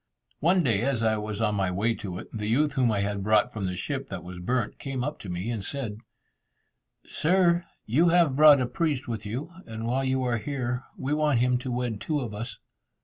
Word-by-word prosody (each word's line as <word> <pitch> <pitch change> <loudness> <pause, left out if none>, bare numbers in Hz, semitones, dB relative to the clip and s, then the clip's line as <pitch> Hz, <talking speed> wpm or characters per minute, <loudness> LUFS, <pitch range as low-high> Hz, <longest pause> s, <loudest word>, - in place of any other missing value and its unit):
One 175 +4 +3
day, 110 -7 +2
as 125 -2 0
I 110 -1 +2
was 105 0 -4
on 105 -1 +2
my 95 -2 +1
way 105 +6 +1
to 95 -5 -6
it, - - -8
the 105 -2 -3
youth 145 +6 +2
whom 130 -5 +2
I 100 -2 +1
had 100 0 -2
brought 110 +4 +3
from 105 -3 -3
the 90 -1 -2
ship 135 +8 -3
that 95 -3 -6
was 90 0 -8
burnt, 120 +4 -1
came 135 -2 -3
up 150 +3 -3
to 100 - -8
me, 90 +6 -3
and 110 -4 -3
said, 115 -4 -4 1.1
"Sir, 175 +1 +2 0.2
you 155 +10 +3
have 165 -5 +4
brought 150 -1 +8
a - - +2
priest 150 -2 -1
with 110 -3 -4
you, 130 +10 -4 0.2
and 115 0 -5
while 130 +3 0
you 130 0 +1
are 120 -1 +1
here, 125 -1 -3
we 135 +3 -2
want 150 -3 +2
him 125 +1 +2
to 130 0 -5
wed 120 -3 -2
two 155 -2 -1
of 120 -6 -4
us." 110 +1 -6
120 Hz, 225 wpm, -27 LUFS, 105-140 Hz, 1.1 s, brought